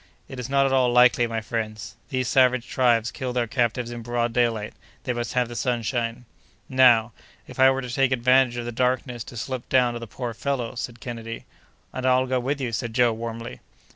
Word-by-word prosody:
"It 130 - -8
is 125 +1 -5
not 140 0 +3
at 135 - +1
all 130 -2 +3
likely, 125 -1 +5
my 115 -1 -3
friends. 110 -1 -5
These 130 -3 -1
savage 130 -1 +3
tribes 120 -3 +2
kill 130 -2 -4
their 120 -1 +1
captives 120 0 -1
in 120 -1 -6
broad 120 0 -1
daylight; 115 -3 0 0.3
they 125 -2 -1
must 120 0 -4
have 125 -1 +1
the 120 - -8
sunshine." 120 0 -2 0.4
"Now, 120 -3 +5 0.3
if - - -12
I 130 0 +7
were 135 0 -1
to 125 -1 -6
take 135 +1 +2
advantage 125 0 +3
of 120 - -4
the 120 - -4
darkness 125 0 -1
to 120 - -10
slip 130 +1 -5
down 125 -2 +3
to 120 - -5
the 115 - -8
poor 120 +2 -5
fellow?" 130 -1 -3
said 120 -1 -6
Kennedy. 115 -2 -7 0.5
"And 130 0 -2
I'll 130 0 +3
go 130 0 0
with 135 +4 -2
you," 125 -3 -2
said 115 0 -4
Joe, 120 -2 +4
warmly. 115 +1 -6
120 Hz, 210 wpm, -24 LUFS, 115-130 Hz, 0.5 s, I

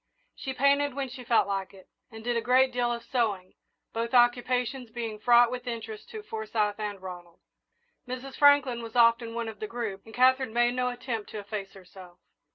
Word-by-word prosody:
She 265 - -5
painted 280 +1 +2
when 275 -2 -3
she 250 0 -9
felt 230 -1 +3
like 195 -1 -3
it, 190 - -16 0.2
and 225 0 -11
did 240 +1 -1
a 230 - +1
great 255 +3 +4
deal 245 -1 +1
of 235 0 -4
sewing, 215 -7 -1 0.4
both 230 +2 -2
occupations 245 +1 +2
being 225 -2 -5
fraught 240 +1 +5
with 250 0 -6
interest 225 -2 -6
to 435 -2 -8
Forsyth 215 - -2
and 205 -2 -4
Ronald. 175 -2 -10 0.7
Mrs. 255 +2 -6
Franklin 285 -4 +4
was 230 0 -9
often 230 -1 +4
one 235 -1 -2
of 220 -2 -8
the 215 - -4
group, 220 -4 -5
and 225 - -12
Katherine 260 -1 +3
made 240 +1 +3
no 250 0 0
attempt 245 -3 -5
to - - -7
efface 200 -1 -6
herself. 180 -1 -14
235 Hz, 190 wpm, -28 LUFS, 215-250 Hz, 0.7 s, fraught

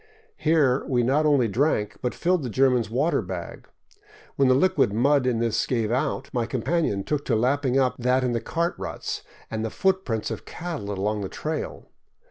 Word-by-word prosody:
Here 150 -5 +2
we 125 -3 +2
not 145 +5 +2
only 140 -5 +4
drank, 115 -2 0
but 125 - -2
filled 180 0 +1
the 130 - -4
German's 125 -1 +2
water 140 +9 +1
bag. - - -7 0.7
When 135 - +3
the 130 - +5
liquid 185 - +3
mud 130 +4 +3
in 120 -2 +1
this 115 -1 0
gave 115 -4 0
out, 130 +2 -1
my 120 -3 0
companion 130 - 0
took 145 +4 -2
to - - +1
lapping 130 +3 +1
up 130 -2 +2
that 125 +1 +2
in 125 - +1
the 115 -1 -1
cart 170 +1 -1
ruts - - -4 0.3
and 110 0 -2
the 110 - -1
footprints 190 - 0
of - - -5
cattle 165 -12 -6
along 105 +2 -1
the 95 - -4
trail. 155 0 -4
130 Hz, 185 wpm, -25 LUFS, 115-150 Hz, 0.7 s, the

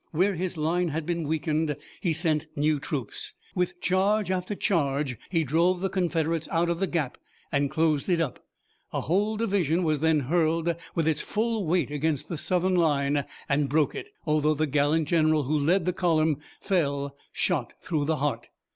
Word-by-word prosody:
Where 185 +5 +2
his 180 0 -3
line 170 +3 +1
had 160 0 -3
been 170 -2 -2
weakened 155 -1 0 0.2
he 175 - +1
sent 160 -1 0
new 150 0 +2
troops. 135 -6 -5 0.2
With 180 -1 -1
charge 195 +2 +2
after 185 +2 -2
charge 140 - 0
he 165 -3 +1
drove 170 +6 +2
the 190 0 -1
Confederates 165 -3 0
out 170 +1 +2
of 170 - -2
the 195 - +1
gap 155 -8 -2 0.3
and 140 0 +1
closed 155 +1 +1
it 175 -2 +3
up. 155 -7 -2 0.5
A - - -1
whole 205 +7 +1
division 185 -6 +1
was 155 -3 +1
then 160 -1 +3
hurled 165 +3 +1 0.2
with 165 -2 +1
its 155 -1 +1
full 220 -3 -1
weight 165 -4 +1
against 150 -1 -1
the 170 - -3
Southern 185 +2 +1
line 145 -4 +2 0.2
and 140 0 +1
broke 150 +1 +2
it, 400 - -6 0.2
although 155 -1 +2
the 155 +2 +1
gallant 145 +2 +2
general 155 -2 +3
who 145 +4 0
led 165 +5 +2
the 180 - +1
column 160 -4 +2 0.2
fell 140 -6 0 0.2
shot 150 -10 -1
through 155 -5 -1
the 160 +1 +1
heart. 145 0 -2
160 Hz, 180 wpm, -27 LUFS, 150-180 Hz, 0.5 s, it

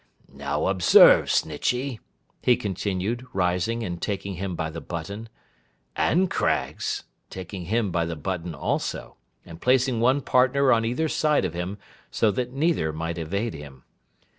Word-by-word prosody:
'Now, 70 +1 -2
observe, 95 -2 +7
Snitchey,' 125 -1 0 0.4
he 125 - +4
continued, 105 +2 -3
rising 90 +5 0
and 85 -4 -5
taking 100 -1 -3
him 95 0 -4
by 80 -1 -3
the 80 +1 -7
button, 100 +7 -6 0.7
'and 185 +3 +2
Craggs,' - - -1 0.3
taking 95 -1 -7
him 110 +1 0
by 85 -1 0
the 85 0 -4
button 85 +1 -4
also, 70 - -3 0.3
and 85 -1 -12
placing 125 -1 +2
one 130 +4 +3
partner 130 +1 +3
on 115 -1 +2
either 125 +8 0
side 150 -7 +1
of 85 - -3
him, 90 +4 -4 0.3
so 110 - +2
that 125 +5 -3
neither 140 - +1
might 80 +2 -4
evade 100 +8 -2
him. 70 -4 -11
100 Hz, 145 wpm, -25 LUFS, 85-125 Hz, 0.7 s, observe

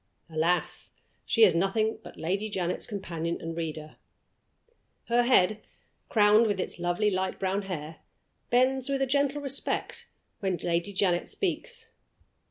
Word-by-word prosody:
Alas! 165 +3 0 0.3
she 230 - +4
is 190 -6 +7
nothing 215 +6 +1
but - - -11
Lady 195 +6 -1
Janet's 180 -3 -2
companion 170 -6 -3
and 165 0 -5
reader. 155 -2 -5 1.1
Her 240 +1 +4
head, 215 -4 +3 0.5
crowned 215 +1 +5
with 205 -2 -1
its 180 - -3
lovely 175 +5 +1
light 190 0 -1
brown 195 +1 0
hair, 160 -5 -6 0.5
bends 260 +2 +2
with 275 -1 +1
a - - +3
gentle 280 +2 +1
respect 275 0 -1 0.3
when 190 -4 -1
Lady 170 +4 -1
Janet 185 -3 +1
speaks. 455 +6 -3
200 Hz, 135 wpm, -28 LUFS, 175-240 Hz, 1.1 s, is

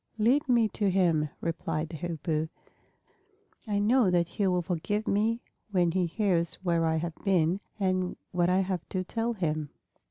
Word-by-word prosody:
"Lead 255 +7 +3
me 235 -3 +4
to 205 0 0
him," 170 -5 +2
replied 165 -1 -2
the 160 - -6
Hoopoe. 160 -1 -2 1.2
"I 205 -1 0
know 220 +1 +4
that 175 -1 +2
he 200 +1 0
will 180 -1 +1
forgive 195 +5 -2
me 220 +4 +1 0.3
when 180 -4 +2
he 180 0 +1
hears 170 -3 +1
where 170 -2 +2
I 160 - +1
have 165 +1 -2
been 185 -2 +2 0.2
and 185 -2 0 0.2
what 175 0 +2
I 185 +1 +3
have 185 -2 -2
to 185 -1 -1
tell 230 +5 -2
him." 155 -7 -2
180 Hz, 165 wpm, -29 LUFS, 165-205 Hz, 1.2 s, me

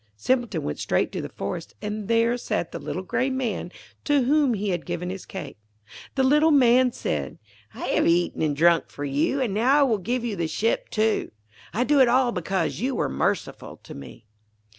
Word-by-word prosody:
Simpleton 245 - 0
went 75 - -4
straight - - 0
to - - -4
the - - -6
forest, 170 -2 -6
and 210 -1 -5
there 230 +1 +3
sat 205 -7 -3
the - - -6
little 185 - -5
grey 255 +7 0
Man 245 -9 -3 0.3
to 290 -3 +2
whom 280 -2 +3
he 205 0 -2
had 175 -3 -1
given 175 +1 -3
his 190 0 -8
cake. 190 - -8 0.6
The 265 - +2
little 300 +4 +4
Man 255 -3 +5
said: 70 - -3 0.4
'I - - -9
have - - +1
eaten 175 +1 +1
and 150 -2 +1
drunk 170 +1 +4
for 145 - -6
you, 145 - 0
and 235 -6 -1
now 255 +8 +3
I - - +7
will 230 -6 +1
give 240 +5 -2
you 225 -4 -2
the 170 -3 -1
ship, 225 +7 -1
too. 220 0 0 0.4
I 235 - 0
do 285 +2 +3
it 260 - +7
all 250 0 +3
because 185 -2 -2
you 255 +2 -1
were - - 0
merciful 65 - -2
to - - -10
me.' 70 - -11
220 Hz, 205 wpm, -24 LUFS, 175-255 Hz, 0.6 s, I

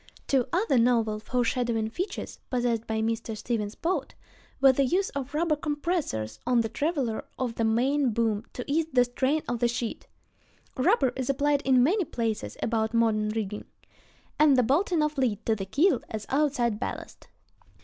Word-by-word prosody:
Two 265 -3 +1
other 345 - +2
novel, 230 -3 +2
foreshadowing 235 -1 -1
features 370 - -5
possessed 240 -3 0
by 220 0 -1
Mr. 225 -1 -2
Stevens' 210 -1 -3
boat, 350 +2 -2 0.4
were 270 -1 +7
the 275 +2 +1
use 370 +9 +1
of 280 +1 -5
rubber 320 0 +2
compressors 290 - -2
on 245 -2 +4
the 225 - -2
traveler 270 -3 -1
of 255 -3 -2
the 230 - -2
main 255 +5 +2
boom 220 -2 0
to 250 - -5
ease 310 +3 0
the 250 -1 +5
strain 265 +5 0
of 240 -1 -2
the 240 - +3
sheet 235 -1 -4 0.7
(rubber 265 - +2
is 260 -1 -3
applied 285 +1 +2
in 260 -3 +4
many 375 - +2
places 230 -7 -3
about 220 0 0
modern 215 -2 +2
rigging), 215 -1 -3 0.7
and 295 -3 +6
the 250 - +4
bolting 315 - +2
of 300 -2 -1
lead 225 -5 0
to 225 - +2
the 195 -2 -5
keel 285 - +2
as 215 -1 -5
outside 260 -6 +1
ballast. - - -6
245 Hz, 170 wpm, -27 LUFS, 225-290 Hz, 0.7 s, were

